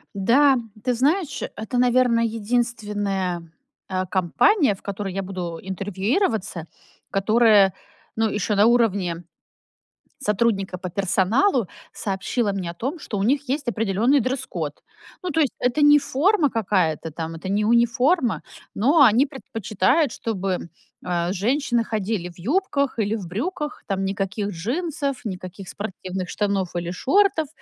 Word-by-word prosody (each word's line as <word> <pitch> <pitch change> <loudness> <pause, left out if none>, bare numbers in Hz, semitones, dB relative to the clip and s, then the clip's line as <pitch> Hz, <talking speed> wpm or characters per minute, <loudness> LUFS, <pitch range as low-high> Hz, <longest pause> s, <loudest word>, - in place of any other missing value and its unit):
Да, 260 +8 +4 0.3
ты 250 +1 0
знаешь, 290 +4 0 0.2
это, 220 +4 -3
наверно, 245 -1 +3
единственная, 210 -6 -1 0.4
э, 185 -1 -1
компания, 205 - +3
в 195 - -14
которой 200 -1 -4
я 195 - -2
буду 180 -3 -5
интервьюироваться, 195 - -1 0.4
которая, 210 -1 +4 0.4
ну, 220 0 +1
ещё 210 0 -1
на 205 - +5
уровне 200 -8 +2 1.0
сотрудника 210 -6 0
по 180 0 -6
персоналу, 200 - +2 0.3
сообщила 200 +3 -1
мне 185 -3 -3
о - - -12
том, 270 - -4
что 210 - -5
у 195 - 0
них 280 +4 +1
есть 280 -1 -1
определённый 225 +5 +2
дресс-код. 225 - -3 0.5
Ну, 365 - -2
то 325 - 0
есть 290 -5 +2
это 250 +4 +1
не 295 0 +7
форма 295 +3 +2
какая-то 180 -8 0
там, 165 +1 -5
это 185 +4 -6
не 205 +2 +1
униформа, 240 +5 +2 0.3
но 260 +10 +2
они 250 +2 +5
предпочитают, 235 - 0
чтобы, 190 -5 -3 0.4
э, 175 0 0
женщины 240 +4 +1
ходили 210 -4 -2
в 175 - -16
юбках 280 - 0
или 210 +1 +1
в 200 -6 -6
брюках, 295 - -4
там 195 -1 -1
никаких 195 +1 -2
джинсов, 275 - -3
никаких 185 -1 -7
спортивных 190 -2 -5
штанов 200 -3 -1
или 175 0 -2
шортов. 330 - +2
215 Hz, 135 wpm, -23 LUFS, 190-255 Hz, 1.0 s, не